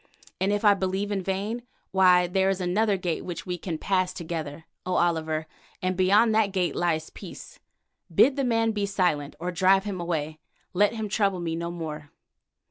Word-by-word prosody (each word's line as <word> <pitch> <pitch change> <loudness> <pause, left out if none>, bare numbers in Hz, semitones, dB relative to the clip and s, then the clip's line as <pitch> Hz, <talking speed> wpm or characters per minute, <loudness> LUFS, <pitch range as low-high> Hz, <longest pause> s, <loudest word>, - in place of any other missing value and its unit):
And 195 +2 +1
if 205 +1 0
I 205 - +8
believe 195 +1 -2
in 200 -2 -1
vain, 200 +5 -2 0.3
why 180 -2 +5
there 190 +2 +1
is 195 -1 0
another 195 +3 +1
gate 175 -3 -2
which 175 -2 -6
we 180 -1 -2
can 165 -3 -4
pass 185 +1 0
together, 160 -2 -5 0.2
O 185 - -2
Oliver, 160 -2 0 0.3
and 185 0 -1
beyond 205 +5 +4
that 215 -2 +3
gate 185 -2 0
lies 160 -3 -1
peace. - - -11 0.5
Bid 270 - +5
the 275 - 0
man 225 -2 +2
be 205 -2 -1
silent, 175 -8 0
or 180 +2 -3
drive 190 +2 +4
him 195 -3 -4
away. 160 -2 -3 0.3
Let 205 +4 +3
him 220 -1 -3
trouble 195 -2 +1
me 165 -1 -2
no 170 +1 -3
more." 155 -4 -6
185 Hz, 185 wpm, -26 LUFS, 170-200 Hz, 0.5 s, I